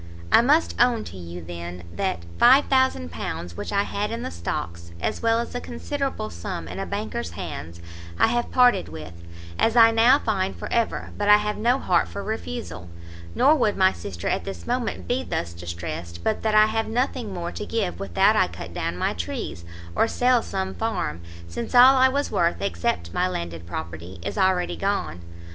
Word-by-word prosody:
I - - +7
must 295 +7 +3
own 240 -3 +3
to - - -9
you, 85 -1 -8
then, 85 +1 -7
that 85 0 -1 0.2
£5000, 240 - +3
which - - -5
I 200 0 +2
had 205 +1 -2
in 230 +1 -4
the - - -4
stocks, 85 0 -5
as - - -2
well 230 0 +3
as 235 - -3
a 245 - -3
considerable 270 - -4
sum 85 -1 -6
in 90 +3 -6
a - - -3
banker's 200 - -4
hands, 85 +2 -6 0.4
I - - +5
have 240 +1 0
parted 250 - +4
with, 80 +2 -8 0.5
as 225 - +3
I 225 -1 +8
now 230 +4 +6
find 195 -8 -1
for - - -6
ever 235 -1 0
but 205 0 +1
I 210 - +9
have 210 0 -2
no 240 +4 +2
heart 85 - +2
for 85 - -6
refusal, 85 +1 -5 0.5
nor 285 +3 +5
would 230 -9 +1
my 190 0 +4
sister 85 -3 -6
at - - 0
this 195 - -7
moment 245 0 -2
be 250 +2 0
thus 85 0 -3
distressed, 85 0 -6
but 215 - 0
that 215 -1 +1
I 215 0 +8
have 225 +1 -1
nothing 245 -1 -1
more 175 -2 -4
to - - -6
give 210 -4 -2
without 95 -3 +3
I - - +4
cut - - -9
down 85 - -3
my - - 0
trees, 85 -1 -5 0.3
or - - +3
sell 245 +1 +3
some 190 -2 -3
farm, 85 - -2 0.3
since 85 - -5
all 255 +2 +9
I 260 0 +5
was 285 +2 -1
worth, 170 0 +1
except 85 -2 -2
my - - +1
landed 85 -2 -5
property, 85 +2 -7
is - - -4
already 190 -2 +1
gone. 90 - -2
190 Hz, 190 wpm, -24 LUFS, -, 0.5 s, I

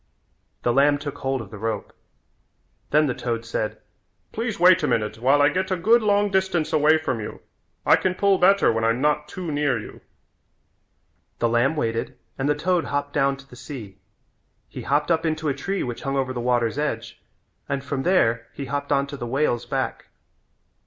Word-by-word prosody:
The 120 - +2
lamb 145 +2 +4
took 145 -1 -7
hold 135 -1 -1
of 100 -4 -11
the 105 - -9
rope. 110 -1 -3 1.0
Then 150 +1 +4
the 130 - 0
toad 115 -2 -3
said, 110 -1 -3 0.5
"Please 225 -3 -3
wait 180 +1 +6
a - - +1
minute 105 0 -1
while 135 +4 +4
I 145 - +6
get 185 +4 -1
a 185 - +1
good 225 +7 +4
long 205 -1 +2
distance 190 -4 0
away 155 +1 +5
from 155 -7 -2
you. 105 - -7 0.5
I - - +6
can 185 -1 -1
pull 200 0 +3
better 195 -7 +5
when 115 0 -1
I'm 115 +2 +2
not 150 +1 +1
too 175 +1 -5
near 145 -3 +1
you." 110 - -9 1.4
The 120 - +1
lamb 120 +6 +2
waited 115 -2 -2 0.2
and 135 +2 0
the 150 - +3
toad 175 +3 0
hopped 145 0 -2
down 140 -1 +2
to 135 0 -15
the 125 - -14
sea. 120 -7 -9 0.7
He - - -8
hopped 145 +3 +1
up 165 0 +2
into 160 -1 -1
a - - +1
tree 195 +7 -3
which 120 -2 -5
hung 135 0 -2
over 130 -1 -1
the 120 - -4
water's 120 +1 +1
edge 115 -7 -3 0.5
and 140 -1 -2
from 140 -1 -3
there 120 -10 +2
he 140 - -6
hopped 140 +2 -3
on 140 0 +3
to 140 0 -8
the 120 - -5
whale's 125 -2 0
back. - - -3
140 Hz, 195 wpm, -23 LUFS, 120-160 Hz, 1.4 s, wait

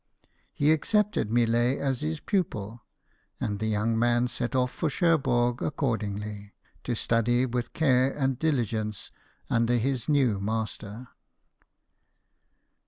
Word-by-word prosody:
He 145 +2 +2
accepted 205 - +1
Millet 120 +2 +2
as 135 -3 -1
his 80 +1 -2
pu 195 -2 +1
pil; 110 - -8 0.6
and 105 -2 -2
the 110 - -1
young 110 +1 0
man 120 +1 +2
set 120 +1 -3
off 125 -1 +1
for 165 - -2
Cherbourg 135 -8 +2
accordingly, 105 -7 -3 0.3
to 120 - -1
study 120 +3 +2
with 120 -1 -3
care 130 -3 +3
and 135 -3 -1
diligence 110 -9 -1 0.4
under 120 +1 +2
his 130 +1 -1
new 130 -9 +3
master. 110 +2 -4
120 Hz, 120 wpm, -27 LUFS, 110-135 Hz, 0.6 s, care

